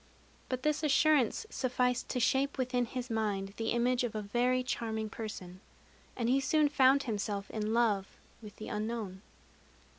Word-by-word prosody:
But 255 0 -3
this 300 0 +1
assurance 300 - +3
sufficed 250 -1 0
to 250 - -1
shape 270 +3 +1
within 250 -1 0
his 250 +1 -5
mind 200 -3 -1
the 225 0 -2
image 245 +1 +2
of 235 -3 -3
a 215 - -1
very 245 +5 +1
charming 220 -3 -3
person; 185 -5 -7 0.6
and 235 -2 0
he 260 +3 +4
soon 295 +2 +3
found 275 -1 +4
himself 205 -3 -3
in 215 0 -2
love 220 -4 +2 0.3
with 210 -2 -11
the 215 - -8
unknown. 210 -3 -4
240 Hz, 155 wpm, -32 LUFS, 215-255 Hz, 0.6 s, he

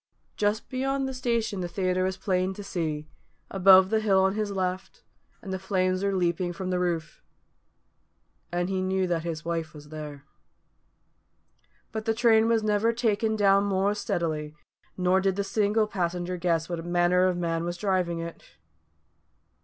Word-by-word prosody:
Just 210 +2 0
beyond 270 +1 -1
the 265 - -4
station 235 -6 -1
the 175 - -2
theatre 185 +1 0
was 190 +1 -1
plain 185 0 0
to 205 - -7
see, 155 -5 -3 0.4
above 190 0 +6
the 220 - +3
hill 195 -3 +3
on 190 0 +2
his 215 0 -2
left, 190 - -3 0.4
and 190 - -5
the 190 - -3
flames 185 0 0
were 200 -1 +1
leaping 175 0 0
from 185 +1 -4
the 180 - 0
roof; 170 -3 -2 1.3
and 175 0 -1
he 190 -1 -1
knew 190 0 0
that 175 -2 0
his 165 -2 -5
wife 165 -2 -3
was 150 0 -12
there. 150 -2 -8 1.7
But 220 -1 -4
the 225 -1 +1
train 225 -1 +4
was 230 -1 +2
never 210 +2 +2
taken 220 -2 +1
down 200 -1 +4
more 200 +1 +1
steadily, 155 -7 -2 0.4
nor 185 +1 +3
did 190 0 0
a 200 - +1
single 210 +2 +1
passenger 180 -2 -2
guess 170 -2 0
what 170 -2 -4
manner 175 +1 +2
of 180 -1 0
man 165 -1 -1
was 175 0 -3
driving 185 -4 0
it. 165 0 -6
185 Hz, 165 wpm, -27 LUFS, 175-205 Hz, 1.7 s, above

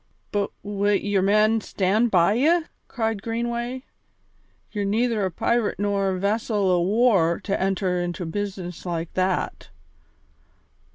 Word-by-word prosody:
"But 205 -1 0
wi' 205 0 0
your 200 -1 +1
men 215 +3 +3
stand 210 +5 +1
by 180 -1 +4
ye?" 315 +8 +3 0.2
cried 225 -4 -2
Greenway. 235 +3 -3 0.9
"Ye're 205 -2 -2
neither 220 +1 +1
a - - 0
pirate 235 +5 0
nor 200 -1 0
a 185 - -1
vessel 205 -1 +1
o' 175 -1 +3
war 195 -4 +3
to 200 -2 -2
enter 190 -2 0
into 175 0 -3
a - - -4
business 185 -1 -5
like 170 -2 -4
that." 185 0 -1
205 Hz, 135 wpm, -24 LUFS, 185-225 Hz, 0.9 s, by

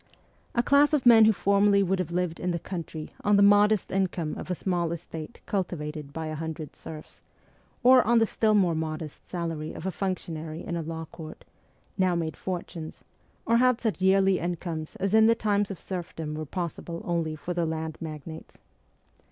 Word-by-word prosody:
A 235 - +3
class 285 +3 +4
of 285 -4 +2
men 225 -2 +8
who 220 - +6
formerly 200 0 +3
would 190 0 0
have 180 -3 -2
lived 175 -1 -2
in 180 - -2
the 170 - 0
country 165 -3 -6
on 205 0 +4
the 200 - +6
modest 205 0 +4
income 185 -4 -1
of - - -7
a 180 - 0
small 175 -2 -1
estate 165 +3 -7
cultivated 155 -7 -3
by 160 +2 -5
a 155 - -4
hundred 160 -1 -6
serfs, 155 -1 -10 0.6
or 255 +1 +8
on 240 0 +3
the 225 - +5
still 215 0 +1
more 185 -5 +3
modest 155 -1 -5
salary 165 -3 -4
of - - -8
a 190 - 0
functionary 165 -5 -4
in 170 - -3
a 170 - -2
law 160 0 -5
court, 155 -2 -10 0.5
now 185 -2 +3
made 165 -2 -2
fortunes, 175 -3 -6 0.4
or 230 - +3
had 250 -1 +4
such 220 -5 -2
yearly 190 0 +4
incomes 170 -2 -4
as 195 +1 -2
in 220 0 +7
the 230 - +5
times 205 -3 +1
of 195 - -6
serfdom 165 -4 -5
were 155 0 -4
possible 170 0 -5
only 165 -2 -1
for 155 +4 -5
the 170 -1 0
land 160 0 -3
magnates. 160 0 -8
175 Hz, 185 wpm, -27 LUFS, 160-200 Hz, 0.6 s, men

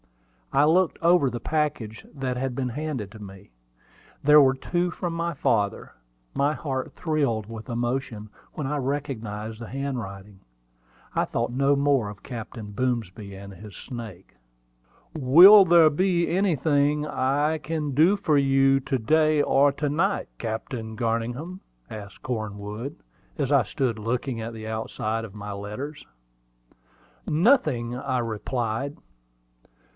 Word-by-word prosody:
I 140 +2 +4
looked 170 +3 +3
over 170 -4 +4
the 120 0 -5
package 145 -6 -2
that 135 -3 -3
had 130 0 -3
been 130 -1 -2
handed 130 -6 -4
to 110 - -12
me. 95 -5 -12 0.7
There 150 +1 +8
were 135 -1 +4
two 175 +6 -1
from 175 -1 -4
my 170 -1 -2
father. 105 -6 0 0.4
My 145 +2 +1
heart 130 -4 -4
thrilled 140 -10 0
with 110 +3 -9
emotion 120 -2 -3 0.2
when 150 -3 -4
I 150 - -1
recognized 115 -6 -4
the 115 - -6
handwriting. 105 -8 -5 0.7
I - - +2
thought 120 - -2
no 140 +2 +3
more 140 -6 +2
of 105 -1 -11
Captain 110 -3 -7
Boomsby 110 -5 -3
and 100 0 -10
his 100 +2 -11
snake. 110 -7 -9 0.8
"Will 175 +10 +9
there 165 -3 +6
be 175 +2 +1
anything 150 -5 +1
I 145 +3 0
can 155 -1 -3
do 165 +9 +4
for 155 -7 +2
you 135 0 +4
to 130 0 -1
day 155 +5 +3
or 140 0 +4
to 145 +1 -2
night, 170 +8 0
Captain 110 0 -5
Garningham?" 120 +10 -2 0.3
asked 100 -2 -9
Cornwood, 110 +2 -5 0.4
as 140 -1 -1
I 140 -3 +5
stood 115 +1 -2
looking 120 +2 -2
at 115 +1 -5
the 110 -1 -8
outside 110 0 -3
of 105 -2 -9
my 105 0 -6
letters. 105 +10 -7 1.2
"Nothing," 150 - +2
I 130 0 -2
replied. 120 +3 -3
130 Hz, 135 wpm, -25 LUFS, 110-150 Hz, 1.2 s, Will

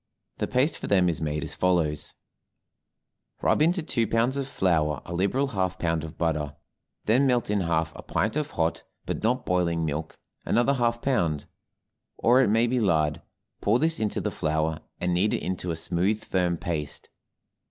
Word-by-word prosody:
The - - 0
paste 130 +5 +1
for - - -5
them 95 -3 +4
is 80 - -1
made 75 -1 -2
as - - -5
follows: 80 -5 0 1.2
Rub - - +2
into 175 +2 +3
two 115 -7 0
pounds 115 +5 +1
of 140 -1 -2
flour 80 - +1
a 85 - -6
liberal 100 +10 +1
half 95 -5 -1
pound 80 -2 0
of 80 0 -8
butter, 75 -3 -1 0.5
then 125 +6 +4
melt 120 -5 +1
in 105 -1 +1
half 80 -2 0
a - - -8
pint 110 - -1
of 150 -1 -1
hot, 80 - -1 0.2
but - - -3
not 125 +3 0
boiling 85 -2 +1
milk, 80 +1 -4 0.3
another 120 +4 +2
half 120 -2 0
pound 85 - 0 0.7
or 125 +3 +5
it - - +3
may 115 +3 +4
be 125 +1 +1
lard; 80 -8 +1 0.4
pour 105 +4 +3
this 160 +4 +1
into 110 -2 -1
the - - -2
flour, 80 +1 -1 0.2
and 90 0 0
knead 95 +5 +2
it - - -4
into 90 -1 -3
a 85 - -1
smooth, 90 +6 0
firm 90 -2 0
paste. 80 -4 -4
90 Hz, 180 wpm, -26 LUFS, 80-120 Hz, 1.2 s, or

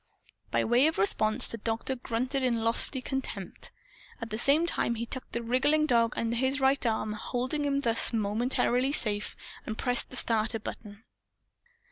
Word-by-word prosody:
By - - +1
way 245 +5 +4
of 320 - -1
response 215 +4 +4
the 230 - -5
Doctor 225 +4 -2
grunted 255 +3 -2
in 235 -3 0
lofty 235 +3 -1
contempt. 270 0 -5 0.5
At 230 -3 -7
the 215 - -2
same 290 +6 +4
time 235 -8 0
he 230 +1 -4
tucked 260 +2 -7
the 235 - -2
wriggling 270 +6 +2
dog 235 -4 +2
under 230 0 -1
his 265 +3 +1
right 270 +1 +2
arm, 220 -1 -1
holding 255 +7 -2
him 280 -1 0
thus 230 -3 +2
momentarily 240 +4 0
safe, 210 -7 -2 0.3
and 220 - -5
pressed 245 -1 +1
the - - -10
self - - +2 0.2
starter 225 - -2
button. 210 0 -9
240 Hz, 170 wpm, -29 LUFS, 225-265 Hz, 0.5 s, way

